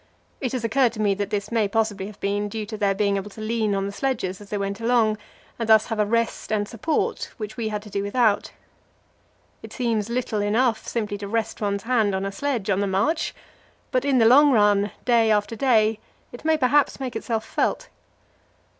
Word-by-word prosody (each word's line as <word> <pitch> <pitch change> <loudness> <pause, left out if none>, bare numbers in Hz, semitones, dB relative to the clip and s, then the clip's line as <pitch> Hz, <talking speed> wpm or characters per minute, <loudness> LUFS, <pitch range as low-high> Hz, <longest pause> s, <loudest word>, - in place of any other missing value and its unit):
It 255 -3 -3
has 250 -3 -2
occurred 240 +1 +2
to 220 - -9
me 205 -2 +2
that 200 0 -3
this 205 0 -3
may 225 -3 +2
possibly 205 -2 -1
have 210 -1 -12
been 205 +1 -1
due 220 0 -4
to 215 +1 -6
their 200 -2 +1
being 200 -1 +1
able 195 +1 -5
to 205 - -13
lean 215 -1 0
on 195 0 -1
the 200 - -3
sledges 205 -5 -2
as 205 - -13
they 210 - -2
went 200 +1 -3
along, 225 -2 +2 0.4
and 230 -1 -3
thus 220 -1 +6
have 225 -2 -4
a 210 - +2
rest 230 0 -1
and 205 -1 0
support 250 +9 -2
which 215 -2 -6
we 230 -2 -3
had 210 -1 -4
to 210 - -11
do 200 - -1
without. 205 +1 +1 1.1
It - - -11
seems 230 -4 -1
little 235 -3 -1
enough 220 +2 +1
simply 210 -3 -3
to 200 - -5
rest 225 +1 -2
one's 200 -1 -1
hand 225 -5 +1
on 190 +1 -2
a 195 - -3
sledge 240 -1 -2
on 190 - +1
the 200 - 0
march, 205 - 0 0.6
but 255 - +1
in 280 -2 +2
the 230 - +5
long 285 +5 +7
run, 205 -3 +3 0.2
day 235 -2 +4
after 210 +1 +1
day, 220 -3 +2 0.3
it 240 - -11
may 315 0 +3
perhaps 280 +1 +2
make 260 -2 -4
itself 225 -2 -2
felt. - - -1
215 Hz, 215 wpm, -24 LUFS, 205-235 Hz, 1.1 s, long